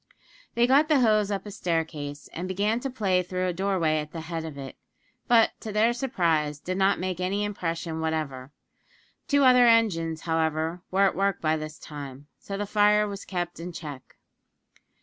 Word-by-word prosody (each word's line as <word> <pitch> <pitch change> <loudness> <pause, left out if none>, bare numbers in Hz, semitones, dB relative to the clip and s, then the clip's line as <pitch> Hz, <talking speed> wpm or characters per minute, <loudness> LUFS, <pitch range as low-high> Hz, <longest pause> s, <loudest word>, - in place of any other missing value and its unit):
They 235 0 +4
got 275 +5 +4
the 300 -4 +4
hose 215 -3 +3
up 200 0 -3
a 205 - -7
staircase, 160 -5 -3
and 175 +3 -4
began 205 +5 0
to 270 - -4
play 195 -7 +1
through 185 +1 -3
a 180 - 0
doorway 175 -4 +1
at 150 0 -6
the 165 - -5
head 165 0 -5
of 155 -3 -7
it; 135 -1 -8 0.5
but, 230 -2 +5
to 220 - -6
their 220 +3 +3
surprise, 165 - 0
did 185 +5 -4
not 195 +1 +3
make 185 -1 -3
any 195 +3 -1
impression 165 -5 -3
whatever. 150 -5 -3 0.8
Two 285 -1 +3
other 250 -2 +7
engines, 165 -9 +2
however, 160 +1 -1
were 195 +1 +3
at 195 - +1
work 195 -1 0
by 155 0 +1
this 155 -1 -6
time 140 -2 -9
so 195 - -6
the 205 - -2
fire 210 +1 +3
was 200 -1 -7
kept 175 -2 -4
in 175 +2 -6
check. 145 -6 -9
180 Hz, 185 wpm, -26 LUFS, 160-210 Hz, 0.8 s, other